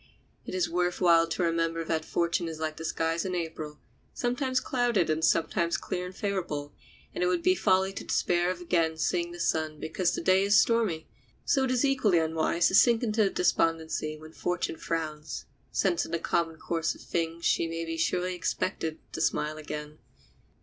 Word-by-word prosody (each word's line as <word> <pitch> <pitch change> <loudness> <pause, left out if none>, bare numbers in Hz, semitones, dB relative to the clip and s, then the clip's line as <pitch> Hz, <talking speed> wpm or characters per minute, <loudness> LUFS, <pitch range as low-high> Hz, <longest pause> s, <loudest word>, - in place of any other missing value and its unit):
It - - -4
is 180 -2 +1
worth 180 +1 0
while 170 -2 +5
to 165 +2 -1
remember 165 0 0
that 160 -1 -1
fortune 170 +1 0
is 160 -1 -6
like 155 -1 -3
the 160 - -6
skies 165 +1 -1
in 185 -1 -2
April, 160 -3 -4 0.4
sometimes 255 +1 0
clouded 240 -11 +1
and 155 +1 -1
sometimes 170 +1 +2
clear 180 0 -4
and 180 - -10
favorable, 175 -9 -3 0.4
and - - -1
it - - +3
would 180 -1 0
be 185 - +5
folly 190 +1 +2
to - - -6
despair 175 0 +1
of 185 -1 -3
again 165 -2 +1
seeing 170 +2 0
the 175 - -9
sun 155 -2 0
because 175 +2 0
to - - -2
day 185 0 +4
is 200 +1 +5
stormy. 220 -9 +1 0.4
So 270 -2 +3
it - - -2
is 255 +2 +2
equally 255 -10 +3
unwise 160 +1 +2
to - - -6
sink 235 +4 +5
into 215 -3 +2
despondency 160 -4 0
when 155 +1 -12
fortune 175 -2 -2
frowns, 155 -2 -4 0.3
since 345 - +1
in - - -8
the 170 - +1
common 165 0 -1
course 165 0 -1
of - - -14
things 165 0 -3
she 165 - +2
may 165 0 -4
be 165 0 -3
surely 180 +3 0
expected 170 -2 -2 0.2
to - - -3
smile 155 +1 0
again. 150 0 -7
170 Hz, 190 wpm, -28 LUFS, 160-185 Hz, 0.4 s, while